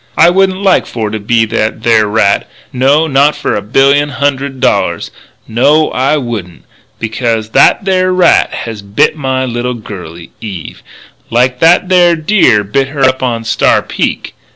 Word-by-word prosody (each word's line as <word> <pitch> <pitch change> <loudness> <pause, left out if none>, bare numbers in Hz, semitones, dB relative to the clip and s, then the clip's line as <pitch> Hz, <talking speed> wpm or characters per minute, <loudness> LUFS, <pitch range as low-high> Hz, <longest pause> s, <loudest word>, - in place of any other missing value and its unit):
I 170 +2 +5
wouldn't 190 +1 0
like 190 -2 +2
for 110 -3 -4
to 110 - -4
be 115 +2 +1
that 110 0 -3
there 110 -2 +3
rat 105 -1 0 0.2
no, 135 +5 +2
not 145 0 +2
for - - -3
a - - -2
billion 140 +7 +2
hundred 140 -1 -2
dollars. - - -1 0.4
No, 150 +7 +2
I 135 +4 0
wouldn't. 110 - -6 0.4
Becuz 115 -1 -2
that 195 - +3
there 185 -1 +1
rat 180 -2 +3
has 110 -3 -6
bit 100 +7 0
my 130 -3 -2
little 120 0 -3
girlie, 90 -7 -10
Eve, 95 -8 -8 0.5
like 125 +2 0
that 175 +3 +3
there 175 -2 +4
deer 155 - +2
bit 135 +7 -1
her 140 0 -6
up 130 0 +2
onto 115 -3 -2
Star 115 - +1
Peak.... - - -3
130 Hz, 160 wpm, -11 LUFS, 110-150 Hz, 0.5 s, I